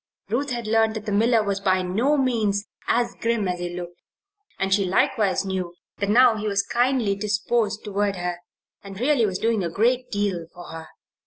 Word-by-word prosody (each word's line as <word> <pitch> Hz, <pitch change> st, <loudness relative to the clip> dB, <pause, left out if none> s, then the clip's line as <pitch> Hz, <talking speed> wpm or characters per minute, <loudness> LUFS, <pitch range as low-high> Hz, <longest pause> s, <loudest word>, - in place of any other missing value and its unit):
Ruth 270 Hz, +7 st, -1 dB
had 240 Hz, -2 st, -3 dB
learned 220 Hz, 0 st, +2 dB
that 215 Hz, -1 st, -5 dB
the 210 Hz, -, -3 dB
miller 225 Hz, +2 st, +3 dB
was 200 Hz, -1 st, -1 dB
by 185 Hz, -1 st, +1 dB
no 230 Hz, +12 st, +1 dB
means 220 Hz, -6 st, +1 dB, 0.2 s
as 240 Hz, 0 st, +1 dB
grim 230 Hz, -3 st, 0 dB
as 180 Hz, -1 st, -2 dB
he 175 Hz, 0 st, -3 dB
looked, 175 Hz, -1 st, -8 dB, 0.6 s
and 195 Hz, 0 st, 0 dB
she 200 Hz, 0 st, +3 dB
likewise 195 Hz, +1 st, +1 dB
knew 185 Hz, -2 st, -3 dB, 0.2 s
that 200 Hz, -, -1 dB
now 235 Hz, 0 st, +5 dB
he 215 Hz, 0 st, -3 dB
was 200 Hz, -1 st, +1 dB
kindly 240 Hz, -4 st, +1 dB
disposed 210 Hz, +1 st, -1 dB
toward 205 Hz, -1 st, -1 dB
her 175 Hz, -1 st, -3 dB, 0.4 s
and 195 Hz, -1 st, -9 dB
really 255 Hz, -3 st, +3 dB
was 190 Hz, -2 st, -2 dB
doing 225 Hz, -2 st, 0 dB
a 170 Hz, -, -1 dB
great 240 Hz, +8 st, +1 dB
deal 200 Hz, -5 st, -2 dB
for 175 Hz, 0 st, -10 dB
her. 160 Hz, 0 st, -8 dB
205 Hz, 190 wpm, -24 LUFS, 190-230 Hz, 0.6 s, now